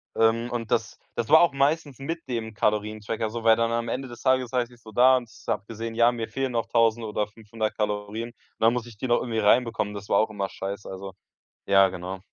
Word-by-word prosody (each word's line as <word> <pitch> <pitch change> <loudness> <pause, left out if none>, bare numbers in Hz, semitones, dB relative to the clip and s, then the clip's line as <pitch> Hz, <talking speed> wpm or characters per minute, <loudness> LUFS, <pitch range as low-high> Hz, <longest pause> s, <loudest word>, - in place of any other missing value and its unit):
Ähm, 115 +2 +2
und 115 -2 -3
das 115 -1 -1 0.2
das 115 -1 -2
war 160 - +8
auch 170 -4 +4
meistens 145 0 +1
mit 165 +2 -5
dem 115 -3 -3
Kalorien-Tracker 105 +1 -1
so, 115 -1 -5
weil 115 -1 +6
dann 115 0 0
am 115 0 -1
Ende 130 +2 -3
des 120 0 -10
Tages 130 -2 +2
saß 125 -2 0
ich 120 -1 -18
so 110 - -12
da 130 +4 +6
und 120 -2 -5 0.2
habe - - -1
gesehen, 115 0 -6
ja, 120 +1 +5
mir 115 -2 -4
fehlen 135 +2 -2
noch 115 -1 -1
1.000 115 -1 +2
oder 105 0 -1
500 110 0 -4
Kalorien, 105 +2 -2
und 120 - -20 0.2
dann 115 +2 +4
muss 125 -2 -2
ich 115 -3 -13
die 130 - -3
noch 120 - +3
irgendwie 115 -2 -2
reinbekommen. 110 -1 +2
Das 100 0 -8
war - - +4
auch 110 - +2
immer 100 -2 -3
scheiße, 100 +1 -6
also, 95 0 -7 0.5
ja, 95 0 +6
genau. 95 +1 -6
115 Hz, 235 wpm, -26 LUFS, 105-120 Hz, 0.5 s, war